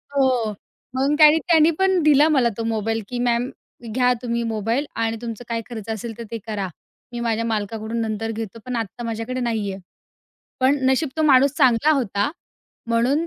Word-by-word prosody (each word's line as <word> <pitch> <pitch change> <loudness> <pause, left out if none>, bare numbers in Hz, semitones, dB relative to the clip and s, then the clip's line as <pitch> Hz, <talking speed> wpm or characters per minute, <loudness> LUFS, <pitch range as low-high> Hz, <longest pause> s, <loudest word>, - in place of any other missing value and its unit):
हो, 255 -5 +2 0.5
मग 275 +3 +2
काय 305 +1 +8
त्यांनी 325 0 +4
पण 380 -2 +3
दिला 300 +1 +5
मला 260 -6 +3
तो 230 - -2
मोबाईल 225 +1 -1
की, 245 -1 -4
"मॅम 245 +1 +1 0.4
घ्या 250 0 +3
तुम्ही 235 -1 -1
मोबाईल 225 +6 -1
आणि 225 0 -1
तुमचं 235 0 -6
काय 230 0 -1
खर्च 225 -2 -7
असेल 225 +1 -5
तर 235 - -6
ते 230 - -3
करा. 200 -3 -2 0.4
मी 240 - -5
माझ्या 230 -1 0
मालकाकडून 220 +1 -3
नंतर 225 0 -2
घेतो 225 0 -6
पण 250 -1 -3
आत्ता 230 +1 -4
माझ्याकडे 230 +3 -3
नाही 220 -4 -1
आहे." 190 - -9 0.8
पण 275 +3 +3
नशीब 280 +3 +1
तो 315 - +1
माणूस 280 -2 +5
चांगला 260 +2 +4
होता, 230 +1 0 0.6
म्हणून 255 +8 +2
235 Hz, 175 wpm, -22 LUFS, 225-265 Hz, 0.8 s, काय